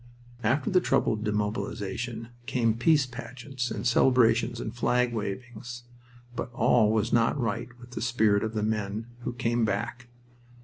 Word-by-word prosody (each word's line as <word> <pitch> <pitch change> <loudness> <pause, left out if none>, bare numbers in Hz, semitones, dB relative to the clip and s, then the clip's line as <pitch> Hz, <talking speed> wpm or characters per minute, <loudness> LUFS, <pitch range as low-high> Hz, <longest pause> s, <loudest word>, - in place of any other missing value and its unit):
After 130 +5 +1
the 185 -1 +5
trouble - - +2
of 110 0 -4
demobilization 105 +2 -2 0.2
came 120 -4 +2
peace 145 +5 +4
pageants 125 +1 -5
and - - -4
celebrations 120 -1 +4
and 110 - -4
flag 125 0 +1
wavings. 120 +3 -5 0.5
But 125 - -4
all 120 -2 +4
was 110 +1 +1
not 115 +4 +3
right 120 0 -1
with 120 0 -13
the 115 - -5
spirit 110 -4 +3
of 110 0 -3
the 105 - 0
men 105 0 -1 0.2
who - - -1
came 120 0 0
back. 115 +4 -2
115 Hz, 150 wpm, -28 LUFS, 110-125 Hz, 0.5 s, the